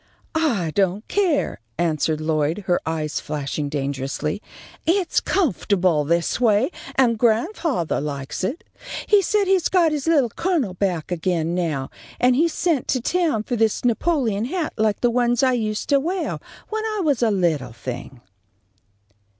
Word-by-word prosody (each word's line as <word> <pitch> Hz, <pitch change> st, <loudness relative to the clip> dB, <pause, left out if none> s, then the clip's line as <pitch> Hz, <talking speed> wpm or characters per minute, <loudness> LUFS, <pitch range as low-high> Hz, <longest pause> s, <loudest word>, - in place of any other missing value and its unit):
"I 240 Hz, -, +1 dB
don't 195 Hz, +2 st, 0 dB
care," 370 Hz, -8 st, +1 dB, 0.2 s
answered 155 Hz, -2 st, 0 dB
Lloyd, 155 Hz, +4 st, 0 dB
her 175 Hz, -2 st, +2 dB
eyes 155 Hz, -2 st, -2 dB
flashing 145 Hz, 0 st, -3 dB
dangerously. 140 Hz, +4 st, -3 dB, 0.5 s
"It's 360 Hz, +1 st, +2 dB
comfortable 185 Hz, -, +1 dB
this 170 Hz, -, 0 dB
way, 230 Hz, -, +3 dB, 0.2 s
and 235 Hz, -4 st, +3 dB
grandfathah 240 Hz, -, +1 dB
likes 140 Hz, +2 st, -4 dB
it. 260 Hz, -, -2 dB, 0.4 s
He 415 Hz, -1 st, +5 dB
says 405 Hz, +2 st, +1 dB
he's 380 Hz, -3 st, +2 dB
got 345 Hz, -4 st, +3 dB
his 300 Hz, 0 st, -2 dB
Little 290 Hz, -7 st, +4 dB
Colonel 315 Hz, -, 0 dB
back 180 Hz, -3 st, -2 dB
again 170 Hz, -1 st, 0 dB
now, 160 Hz, -7 st, -2 dB, 0.3 s
and 250 Hz, 0 st, +4 dB
he 320 Hz, +6 st, +4 dB
sent 330 Hz, -4 st, 0 dB
to 255 Hz, -, +1 dB
town 315 Hz, -4 st, 0 dB
for 245 Hz, -, -2 dB
this 225 Hz, +1 st, +1 dB
Napoleon 235 Hz, -4 st, +1 dB
hat 325 Hz, +4 st, -2 dB
like 215 Hz, -2 st, +1 dB
the 245 Hz, -, +3 dB
ones 240 Hz, +1 st, +2 dB
I 260 Hz, -1 st, +4 dB
used 215 Hz, -3 st, -2 dB
to 280 Hz, -, +5 dB
weah 355 Hz, +6 st, -2 dB, 0.3 s
when 435 Hz, 0 st, -2 dB
I 430 Hz, -2 st, -1 dB
was 290 Hz, -6 st, +1 dB
a 235 Hz, -, +4 dB
little 165 Hz, -, 0 dB
thing." 120 Hz, +1 st, -7 dB
220 Hz, 150 wpm, -22 LUFS, -, 0.5 s, He